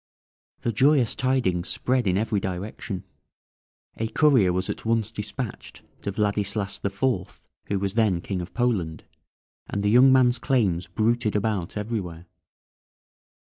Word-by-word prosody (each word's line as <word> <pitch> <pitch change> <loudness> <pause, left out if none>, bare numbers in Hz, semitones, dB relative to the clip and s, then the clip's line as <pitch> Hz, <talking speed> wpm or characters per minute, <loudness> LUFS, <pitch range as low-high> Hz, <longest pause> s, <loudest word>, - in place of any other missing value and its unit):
The 120 - 0
joyous 130 0 +4
tidings 125 -9 0
spread 125 -3 0
in 90 0 +2
every 110 0 0
direction; 95 +1 -5 0.9
a 115 - -1
courier 120 -6 +4
was 95 +1 -1
at - - -5
once 115 -1 +1
despatched 115 +2 -6 0.2
to 100 - -3
Vladislas 100 -1 -1
the 100 - -1
Fourth, 100 -2 -2 0.2
who 100 - 0
was 95 0 -2
then 110 -6 +2
King 90 +1 -4
of 90 +1 -8
Poland, 95 - 0 0.6
and 100 - -3
the 105 - +2
young 130 +3 +7
man's 125 -2 +4
claims 105 - +1
bruited 110 -1 0
about 105 -3 -1
everywhere. 100 -6 -4
105 Hz, 140 wpm, -25 LUFS, 95-120 Hz, 0.9 s, young